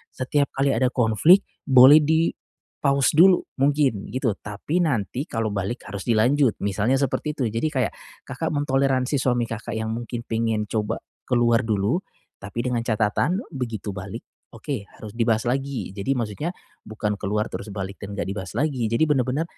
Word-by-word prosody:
setiap 140 Hz, +2 st, 0 dB
kali 135 Hz, +1 st, +2 dB
ada 125 Hz, +3 st, +2 dB
konflik 125 Hz, -, +4 dB, 0.2 s
boleh 135 Hz, +3 st, +9 dB
di-pause 150 Hz, -3 st, 0 dB
dulu 180 Hz, +2 st, +7 dB, 0.2 s
mungkin 140 Hz, -7 st, +1 dB
gitu 130 Hz, -2 st, 0 dB
tapi 110 Hz, -, -3 dB
nanti 135 Hz, -, -1 dB
kalau 115 Hz, -, -2 dB
balik 100 Hz, +4 st, -3 dB
harus 100 Hz, +3 st, -7 dB
dilanjut, 120 Hz, +3 st, +3 dB
misalnya 105 Hz, +6 st, +1 dB
seperti 140 Hz, +3 st, -1 dB
itu. 135 Hz, -, -2 dB
Jadi 115 Hz, +8 st, 0 dB
kayak 130 Hz, -6 st, -1 dB, 0.3 s
Kakak -, -, -4 dB
mentoleransi 135 Hz, -1 st, +1 dB
suami 125 Hz, -2 st, +1 dB
Kakak 115 Hz, 0 st, -5 dB
yang 110 Hz, 0 st, -2 dB
mungkin 120 Hz, +1 st, -5 dB
pingin 115 Hz, -2 st, -1 dB
coba 105 Hz, -2 st, -2 dB, 0.2 s
keluar 120 Hz, -1 st, +2 dB
dulu, 105 Hz, -, +1 dB, 0.4 s
tapi 105 Hz, +4 st, -5 dB
dengan 125 Hz, -1 st, 0 dB
catatan 115 Hz, -, 0 dB
begitu 115 Hz, -, -4 dB
balik 95 Hz, +4 st, -7 dB, 0.3 s
oke 115 Hz, -4 st, -5 dB
harus 105 Hz, -2 st, -11 dB
dibahas 115 Hz, -1 st, +1 dB
lagi. 135 Hz, -6 st, -2 dB
Jadi 100 Hz, +8 st, -2 dB
maksudnya 120 Hz, -, -3 dB, 0.3 s
bukan 105 Hz, -1 st, -3 dB
keluar 105 Hz, +2 st, -1 dB
terus -, -, -6 dB
balik 100 Hz, 0 st, -5 dB
dan 100 Hz, 0 st, -7 dB
nggak -, -, -2 dB
dibahas 95 Hz, -1 st, -5 dB
lagi, 135 Hz, -7 st, 0 dB
jadi 115 Hz, +7 st, +1 dB
benar-benar 135 Hz, +2 st, +1 dB
120 Hz, 155 wpm, -24 LUFS, 105-140 Hz, 0.4 s, boleh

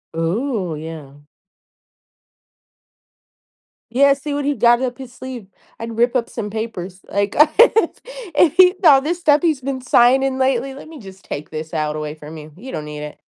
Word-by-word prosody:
Ooh, 185 Hz, -, -2 dB
yeah. 150 Hz, -3 st, -9 dB, 2.7 s
Yeah, 280 Hz, +2 st, +5 dB
see 285 Hz, +1 st, -6 dB
what 285 Hz, -1 st, -2 dB
he 290 Hz, -1 st, 0 dB
got 240 Hz, +2 st, +4 dB
up 245 Hz, -2 st, -3 dB
his 260 Hz, -2 st, -10 dB
sleeve. 255 Hz, -7 st, -8 dB, 0.3 s
I'd 230 Hz, 0 st, -7 dB
rip 240 Hz, +2 st, +2 dB
up 235 Hz, -2 st, 0 dB
some 210 Hz, -3 st, -5 dB
papers, 195 Hz, -4 st, -6 dB
like, 200 Hz, 0 st, -1 dB, 0.2 s
if 450 Hz, -2 st, +5 dB, 0.4 s
if 325 Hz, -, +4 dB
he 365 Hz, 0 st, +7 dB
saw 285 Hz, -6 st, +6 dB
this 340 Hz, +4 st, -2 dB
stuff 300 Hz, -3 st, +3 dB
he's 315 Hz, -5 st, +1 dB
been 260 Hz, 0 st, -4 dB
signing 260 Hz, +2 st, +3 dB
lately, 265 Hz, 0 st, 0 dB
let 280 Hz, -, -11 dB
me 320 Hz, -1 st, -11 dB
just 190 Hz, -2 st, -13 dB
take 145 Hz, -, -6 dB
this 155 Hz, +1 st, -7 dB
out 155 Hz, -1 st, -2 dB
away 150 Hz, 0 st, -5 dB
from 155 Hz, +1 st, -11 dB
you. 150 Hz, 0 st, -12 dB
You 250 Hz, +8 st, -10 dB
don't 155 Hz, -2 st, -5 dB
need 150 Hz, 0 st, -7 dB
it. 150 Hz, 0 st, -9 dB
235 Hz, 175 wpm, -19 LUFS, 165-270 Hz, 2.7 s, he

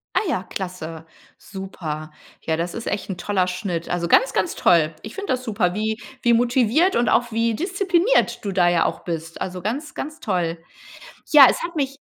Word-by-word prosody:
Ja. -, -, +4 dB
Ah, -, -, -2 dB
ja 190 Hz, -, -1 dB
klasse. 170 Hz, -4 st, -6 dB, 0.3 s
Super. 160 Hz, -6 st, -7 dB, 0.3 s
Ja 160 Hz, -, -1 dB
das 170 Hz, +1 st, -3 dB
ist 230 Hz, -, -6 dB
echt 205 Hz, -, -3 dB
'n 190 Hz, -, -4 dB
toller 185 Hz, 0 st, 0 dB
Schnitt. 180 Hz, -2 st, -3 dB
Also 175 Hz, -1 st, -1 dB
ganz -, -, +4 dB
ganz 345 Hz, -, 0 dB
toll. 165 Hz, -2 st, +3 dB
Ich 215 Hz, -, -9 dB
finde 400 Hz, -5 st, -2 dB
das 255 Hz, 0 st, -3 dB
super, 205 Hz, -7 st, 0 dB
wie 215 Hz, +2 st, -1 dB, 0.2 s
wie 235 Hz, -, +4 dB
motiviert 245 Hz, -, +3 dB
und 240 Hz, -, +2 dB
auch 240 Hz, -1 st, +2 dB
wie 230 Hz, +1 st, +1 dB
diszipliniert 370 Hz, -, +1 dB
du 200 Hz, -, -1 dB
da 180 Hz, -2 st, +3 dB
ja 175 Hz, -1 st, +2 dB
auch -, -, -2 dB
bist. 165 Hz, -1 st, -5 dB
Also 185 Hz, -1 st, -4 dB
ganz 255 Hz, -, -3 dB
ganz 305 Hz, +2 st, -6 dB
toll. 175 Hz, -4 st, -1 dB, 0.8 s
Ja 290 Hz, -3 st, +10 dB
es -, -, -1 dB
hat 340 Hz, 0 st, -5 dB
mich 275 Hz, -2 st, -1 dB
205 Hz, 200 wpm, -22 LUFS, 175-255 Hz, 0.8 s, Ja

